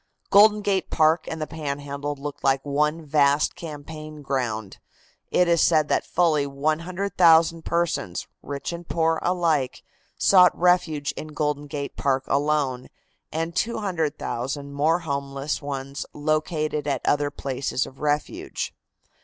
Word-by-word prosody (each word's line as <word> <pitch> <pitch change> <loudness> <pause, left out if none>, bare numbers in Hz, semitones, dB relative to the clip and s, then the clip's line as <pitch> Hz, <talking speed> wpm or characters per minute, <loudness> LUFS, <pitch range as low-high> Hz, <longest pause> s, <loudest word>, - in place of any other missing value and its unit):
Golden 210 +1 +6
Gate 195 -2 0
Park 160 +1 +3
and 160 - -4
the 155 - -2
Panhandle 145 -1 -4
looked 145 +1 -7
like 135 0 +2
one 150 +3 0
vast 145 0 +3
campaign 155 -2 -8
ground. 120 -7 -3 0.5
It 180 - +3
is 170 -1 +3
said 155 -3 +3
that - - +1
fully 155 -5 +2
100,000 165 +3 +2
persons, 170 - -1 0.2
rich 140 +4 -5
and 170 0 -8
poor 165 -1 +1
alike, 165 -7 0 0.3
sought 180 -2 +6
refuge 165 -5 +2
in 155 - -7
Golden 150 -1 -2
Gate 140 0 -5
Park 135 -1 +1
alone, 140 -3 0 0.4
and 165 +2 -3
200,000 155 - -2
more 155 +4 +2
homeless 140 -1 -3
ones 140 -1 -5
located 155 0 -1
at 135 -3 -1
the - - +1
other 145 0 +1
places 135 -2 -2
of 135 - -13
refuge. 150 0 -2
150 Hz, 130 wpm, -24 LUFS, 140-165 Hz, 0.5 s, Golden